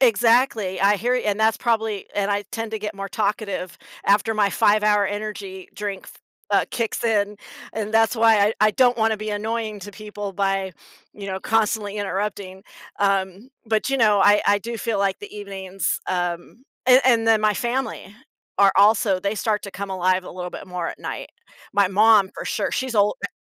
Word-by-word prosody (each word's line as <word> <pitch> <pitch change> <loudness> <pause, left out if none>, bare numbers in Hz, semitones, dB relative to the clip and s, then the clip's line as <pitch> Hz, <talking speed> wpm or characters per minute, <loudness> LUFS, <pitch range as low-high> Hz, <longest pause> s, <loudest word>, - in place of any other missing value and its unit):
Exactly, 230 -5 +3
I 200 +1 +4
hear 245 +5 0
and 210 0 0
that's 220 0 +3
probably 220 -4 -1
and 205 0 0
I 205 0 -1
tend 225 -1 -4
to 220 - -3
get 210 0 -5
more 195 0 -6
talkative 200 -3 -3 0.3
after 210 +3 +3
my 210 -2 +2
5-hour 210 +1 +3
ENERGY 205 -2 -6
drink 200 -2 -5
f - - -12 0.4
uh, - - +3
kicks 230 -2 -2
in, 210 -3 0 0.4
and 215 -1 -4
that's 225 +2 +3
why 225 -1 +5
I 205 +2 +3
I 215 0 +5
don't 245 +2 +3
wanna 220 -1 +1
be 215 +1 -5
annoying 215 0 -3
to 205 +2 -8
people 205 -1 -7
by, 195 -1 -1 0.4
you 200 -1 -9
know, 190 -1 -4
constantly 215 -1 0
interrupting, 195 -1 -4 0.4
um, 195 +3 0 0.2
but, 220 +4 0
you 270 - +1
know, 210 -5 +4
I 205 +1 +5
I 205 0 +4
do 230 +3 -6
feel 225 -1 -2
like 195 -1 0
the 205 - -11
evenings, 195 -2 -3
um 175 +5 -3 0.2
a 255 +1 +6
and 230 -3 +3
then 225 -1 +4
my 210 -1 +2
family 240 -3 -3 0.4
are 200 -1 +5
also 200 -1 +4
they 200 +2 -2
start 210 0 -1
to 200 - -7
come 200 0 -6
alive 185 0 +1
a - - -9
little 180 0 -6
bit - - -9
more 180 -2 -3
at - - -8
night. - - -6 0.4
My 200 -1 +3
mom, 205 0 +5
for - - -7
sure, - - -2
she's 260 -2 -3
ol 205 -1 +3
eh - - -1
205 Hz, 190 wpm, -22 LUFS, 195-220 Hz, 0.4 s, a